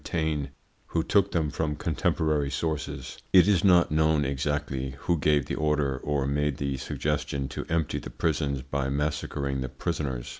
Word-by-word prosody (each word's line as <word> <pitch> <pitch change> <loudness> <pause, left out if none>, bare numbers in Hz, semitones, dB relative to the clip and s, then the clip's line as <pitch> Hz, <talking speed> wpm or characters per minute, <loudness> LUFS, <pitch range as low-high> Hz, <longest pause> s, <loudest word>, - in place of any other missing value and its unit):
Taine, 80 -4 -1 0.4
who 80 - 0
took 100 +2 +3
them 80 -4 0
from 75 0 -1
contemporary 80 -3 0
sources. 75 +2 -3
It 95 0 +7
is 100 -4 +3
not 90 -5 +5
known 80 -1 +3
exactly 70 -1 -2
who 85 -2 +1
gave 75 -1 +3
the - - -4
order 75 -3 0
or 70 -1 -1
made 70 -1 0
the 70 -1 -2
suggestion 70 0 -2
to - - -5
empty 80 -2 0
the - - -8
prisons 70 -4 -1
by 70 0 -2
massacring 70 -1 -1
the 65 - -3
prisoners. 65 -3 -3
75 Hz, 160 wpm, -27 LUFS, 70-80 Hz, 0.4 s, It